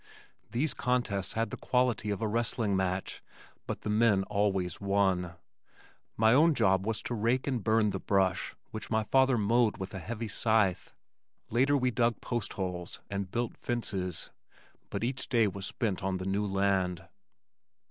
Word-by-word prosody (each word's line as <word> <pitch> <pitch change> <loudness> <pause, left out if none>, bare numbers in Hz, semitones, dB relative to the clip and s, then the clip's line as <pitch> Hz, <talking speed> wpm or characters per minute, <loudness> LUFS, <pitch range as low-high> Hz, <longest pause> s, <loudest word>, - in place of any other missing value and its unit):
These 135 +4 0
contests 110 -7 -1
had 115 +1 -1
the - - -5
quality 125 -4 +1
of 105 +2 -2
a - - +1
wrestling 115 -2 0
match 95 0 -2 0.5
but - - -4
the 105 - -4
men 105 -3 +3
always 95 -3 -1
won. 95 -3 +1 0.8
My 110 +1 +5
own 155 +4 +5
job 95 -2 +2
was 115 -1 -1
to - - -3
rake 120 +3 +1
and 125 -6 -1
burn 110 -2 +3
the 95 - -3
brush 95 -2 +1 0.2
which 110 - -6
my 110 -1 +1
father 130 +2 +3
mowed 115 +1 +2
with 95 +1 -6
a 95 - -4
heavy 115 +6 -5
scythe. 105 -4 +1 0.6
Later 135 +5 +3
we 125 -1 +1
dug 120 0 +1
postholes 95 -7 -4
and 100 -1 -3
built 120 +3 -2
fences 95 -7 -3 0.6
but - - -3
each 125 +2 -2
day 115 -4 +4
was 100 -1 -3
spent 105 -6 -2
on 95 -1 -1
the 90 - -5
new 100 +2 0
land. 95 -3 0
105 Hz, 160 wpm, -30 LUFS, 95-120 Hz, 0.8 s, My